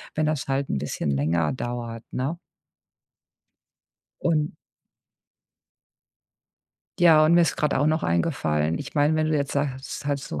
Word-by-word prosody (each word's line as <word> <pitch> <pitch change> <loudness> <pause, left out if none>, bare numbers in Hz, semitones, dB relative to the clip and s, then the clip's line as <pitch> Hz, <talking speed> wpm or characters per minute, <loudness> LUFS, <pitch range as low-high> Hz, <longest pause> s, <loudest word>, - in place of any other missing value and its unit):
wenn 155 - +1
das 150 -2 -1
halt 135 0 -1
'n 70 - -1
bisschen 70 - -2
länger 80 +4 +1
dauert, 120 -2 -5
ne? 140 +7 -2 1.8
Und 155 -2 +1 2.5
Ja, 160 -3 +7
und 160 - +4
mir 175 - +6
ist 165 - 0
gerade 150 -1 +1
auch 145 - +2
noch 155 +1 +1
eingefallen 80 - 0
ich - - -8
meine, 145 +1 +3
wenn 155 0 +1
du 155 - +2
jetzt 140 -1 -2
sagst, 140 -1 -3
halt 145 -1 0
so 75 - -6
140 Hz, 145 wpm, -25 LUFS, 115-155 Hz, 2.5 s, Ja